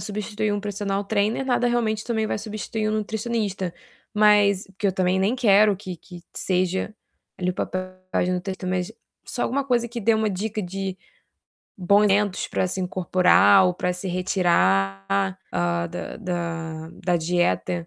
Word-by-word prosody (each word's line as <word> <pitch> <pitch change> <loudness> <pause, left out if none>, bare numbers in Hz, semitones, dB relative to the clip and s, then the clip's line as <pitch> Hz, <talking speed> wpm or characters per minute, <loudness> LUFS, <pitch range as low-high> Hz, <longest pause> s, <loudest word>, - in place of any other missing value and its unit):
substituir 210 0 -2
um 205 - -1
personal 200 -1 -2
trainer, 215 +5 0
nada 245 -1 +1
realmente 225 -3 0
também 220 -2 -1
vai - - -2
substituir 215 0 -3
um - - -1
nutricionista. 215 -4 -2 0.4
Mas 210 -2 +4
porque 195 +1 -4
eu 190 - +2
também 185 0 +1
nem 195 +5 +2
quero 210 -3 +5
que 185 -2 -7
que 175 +1 -13
seja 185 +3 -1 0.4
ali 180 0 0
o - - -6
papel 185 +1 -2 0.3
da - - +2
nutricionista, 185 +1 -3
mas 185 +3 -2 0.3
só 245 - -3
alguma 275 +2 0
coisa 245 -3 +1
que 235 +1 -5
dê 225 +1 +3
uma 220 -1 +1
dica 210 +3 -3
de 190 +1 -4 0.8
bons 200 +3 +4
alimentos 205 -1 +1 1.2
ou 180 -1 +2
pra 180 0 -1
se 180 +1 -5
retirar, 95 - +1
hã, 85 0 0
da 90 - -6
da 165 -4 -4 0.2
da 175 -1 +2
dieta. 175 0 0
195 Hz, 150 wpm, -24 LUFS, 180-215 Hz, 1.2 s, quero